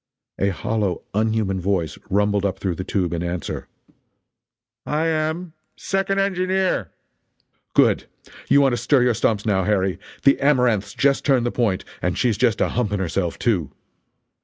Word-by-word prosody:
A 100 - +2
hollow, 100 0 -2
unhuman 110 -3 0
voice 90 -4 -1
rumbled 100 0 +1
up 95 -1 -1
through 95 -2 -2
the 90 - -5
tube 90 -3 -1
in 85 - -2
answer: 85 -1 -4 1.2
"I 155 +2 -1
am. 160 +1 -1 0.2
Second 195 0 -1
engineer." 190 -1 0 0.9
"Good! - - +4 0.4
You 140 - +6
want 135 -2 +3
to - - 0
stir 125 +3 +3
your 125 -1 +3
stumps, 105 -1 0
now, 100 -3 +2
Harry 95 -1 0 0.2
the 140 - +5
Amaranth's 125 -8 +2
just 140 0 +2
turned 130 -4 +2
the 120 - 0
point 110 -7 0 0.2
and - - -1
she's 120 -4 +2
just 120 -4 +2
a - - +2
humping 105 -4 -1
herself, 90 -1 -2
too!" 90 - 0
110 Hz, 155 wpm, -22 LUFS, 95-140 Hz, 1.2 s, You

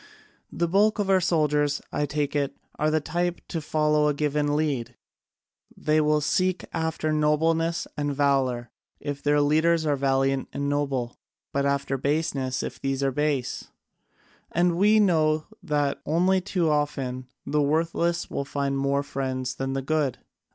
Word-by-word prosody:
The 170 - 0
bulk 205 +5 +3
of 200 -2 0
our 190 -1 +4
soldiers, 150 -4 +1
I 145 - -1
take 145 0 -2
it, 140 -2 -1 0.2
are 150 - +2
of - - +2
the 155 - +2
type 175 +3 -1
to 165 - -3
follow 150 0 +2
a 150 - +1
given 145 0 0
lead: 135 -6 -1 0.8
they 155 0 +2
will 150 0 +2
seek 185 +5 0
after 160 -1 -1
nobleness 160 +2 +1
and 145 -1 -1
valour 135 -4 +1 0.3
if 145 -1 -5
their 145 0 +3
leaders 160 +3 +3
are 145 -2 +2
valiant 135 0 +1
and 140 - -2
noble, 140 -4 -1 0.3
but 140 0 +1
after 140 -1 -1
baseness 140 -3 -1
if - - -6
these 135 0 -1
are 135 - +2
base. 145 -2 -1 0.8
And 175 0 +2
we 210 +4 +4
know 155 -6 +3 0.2
that 145 -2 -1
only 185 +4 +3
too 180 -3 0
often 135 -4 -1 0.2
the 150 +1 +1
worthless 165 +3 0
will - - -3
find 140 0 -2
more 140 +1 +1
friends 130 -2 -3
than 135 +1 -3
the 135 0 -2
good. 145 -3 0
150 Hz, 160 wpm, -26 LUFS, 140-160 Hz, 0.8 s, our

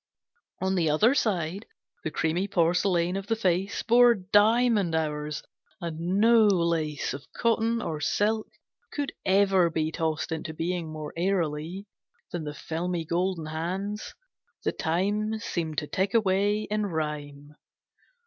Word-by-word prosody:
On 190 0 +1
the 170 -4 +2
other 210 - +4
side, 195 - -1 0.4
The - - -1
creamy 165 +5 0
porcelain 175 0 +2
of 195 0 -4
the 225 - +1
face 190 0 0
Bore 240 +1 +6
diamond 205 -1 +3
hours, 150 -1 -2 0.4
and 170 +2 -2
no 225 0 +6
lace 170 -6 0
Of 140 - -9
cotton 230 0 +1
or 155 -2 -3
silk 215 +6 +1 0.4
could 290 -1 -2 0.2
ever 190 -2 +4
be 160 -1 -1
Tossed 160 -1 -2
into 160 0 -4
being 170 -1 -2
more 155 -1 -6
airily 170 0 -1 0.5
Than 170 -3 -4
the 150 0 -5
filmy 170 +2 -3
golden 175 0 -1
hands; 185 +7 -4 0.5
the - - +1
time 205 +6 0
Seemed 165 -7 -3
to 150 - 0
tick 195 +5 -1
away 205 0 +2
in 210 -1 0
rhyme. 150 -3 -5
180 Hz, 135 wpm, -27 LUFS, 160-205 Hz, 0.5 s, Bore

